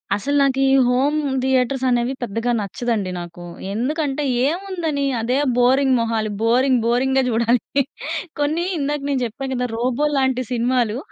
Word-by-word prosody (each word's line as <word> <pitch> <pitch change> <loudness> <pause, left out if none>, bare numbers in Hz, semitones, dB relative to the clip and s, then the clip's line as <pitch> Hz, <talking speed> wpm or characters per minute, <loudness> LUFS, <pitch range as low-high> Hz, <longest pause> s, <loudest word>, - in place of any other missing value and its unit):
అసలు 280 +8 -2
నాకు 270 -1 +2
ఈ - - +3 0.2
హోమ్ 270 +5 +2 0.2
థియేటర్స్ 260 0 +1
అనేవి 245 +1 +1
పెద్దగా 230 +2 -2
నచ్చదండి 210 -1 -2
నాకు. 175 0 -8 0.3
ఎందుకంటే, 290 +5 -1 0.2
ఏముందని 335 -4 -2 0.2
అదే 250 +4 0 0.2
బోరింగ్ 260 +2 +4
మొహాలు, 225 -2 -1
బోరింగ్, 250 +3 +3
బోరింగ్‌గా 265 +3 +2
చూడాలి. 235 +4 +1 0.6
కొన్ని 305 +4 0
ఇందాక 295 0 -2
నేను 270 -2 0
చెప్పా 255 +4 -5
కదా! 250 -1 -1
'రోబో' 250 +5 0
లాంటి 260 -1 +1
సినిమాలు 240 -2 +1
255 Hz, 135 wpm, -21 LUFS, 235-275 Hz, 0.6 s, బోరింగ్